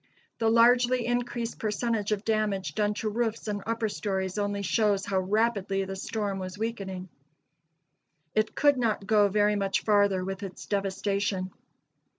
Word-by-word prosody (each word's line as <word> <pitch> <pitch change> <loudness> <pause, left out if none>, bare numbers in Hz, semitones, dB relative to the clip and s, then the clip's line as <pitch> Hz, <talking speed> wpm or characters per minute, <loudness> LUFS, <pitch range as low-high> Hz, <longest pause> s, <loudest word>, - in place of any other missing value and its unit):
The 225 -1 +3
largely 240 +1 +4
increased 240 -1 -2
percentage 215 0 -1
of 210 0 -1
damage 215 -4 0
done 210 0 0
to 215 +1 -2
roofs 225 0 -2
and 205 -1 -2
upper 230 0 0
stories 190 -2 -2
only 205 0 -1
shows 205 -1 +1
how 190 -1 0
rapidly 195 -1 0
the 195 0 -5
storm 200 0 -3
was 185 +1 -6
weakening. 195 -4 -4 1.3
It 215 0 0
could 290 -2 +4
not 220 -4 0
go 210 -1 +4
very 210 +1 +3
much 195 -1 0
farther 200 -3 +3
with 195 +1 -4
its 195 -2 -7
devastation. 195 -1 -1
210 Hz, 150 wpm, -28 LUFS, 195-225 Hz, 1.3 s, largely